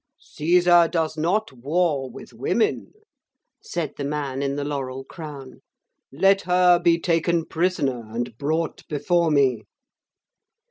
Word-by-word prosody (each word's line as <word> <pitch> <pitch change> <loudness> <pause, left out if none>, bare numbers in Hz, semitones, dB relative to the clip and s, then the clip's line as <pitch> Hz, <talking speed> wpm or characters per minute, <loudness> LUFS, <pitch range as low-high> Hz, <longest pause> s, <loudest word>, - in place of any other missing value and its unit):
'Caesar 175 +2 +3
does 160 -2 -1
not 180 +7 0
war 140 +1 0
with - - -12
women,' 430 - -1 0.7
said 165 -5 -4
the 145 - -4
man 140 -2 -3
in 140 0 -1
the 145 - -3
laurel 135 -2 -4
crown; 140 -3 -10 0.5
'let 195 +7 +3
her 180 0 +4
be 170 -1 +3
taken 165 0 +1
prisoner 150 -9 -1
and 120 +1 -4
brought 160 +3 -2
before 170 +3 +1
me.' 135 -7 +2
155 Hz, 125 wpm, -23 LUFS, 140-175 Hz, 0.7 s, her